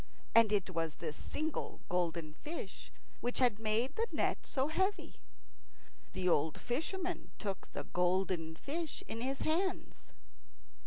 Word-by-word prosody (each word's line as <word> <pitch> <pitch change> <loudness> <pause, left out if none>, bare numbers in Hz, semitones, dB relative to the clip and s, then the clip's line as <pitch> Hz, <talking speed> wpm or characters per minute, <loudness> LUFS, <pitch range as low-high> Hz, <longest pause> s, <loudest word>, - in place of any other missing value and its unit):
And 230 -2 +7
it 195 -3 +2
was 165 -3 -1
this 155 -3 -4
single 310 - -2
golden 170 -3 0
fish 310 - -6 0.3
which 245 +1 -1
had 240 -5 +4
made 225 +5 +2
the 455 +1 +1
net - - +1
so 270 0 +1
heavy. 380 +6 0 0.9
The 185 - 0
old 160 -2 +3
fisherman 355 +8 -2
took 195 -3 -4
the - - -3
golden 180 -2 +1
fish 310 - -3
in 225 - -4
his 270 +2 -1
hands. 360 +4 0
225 Hz, 135 wpm, -35 LUFS, -, 0.9 s, And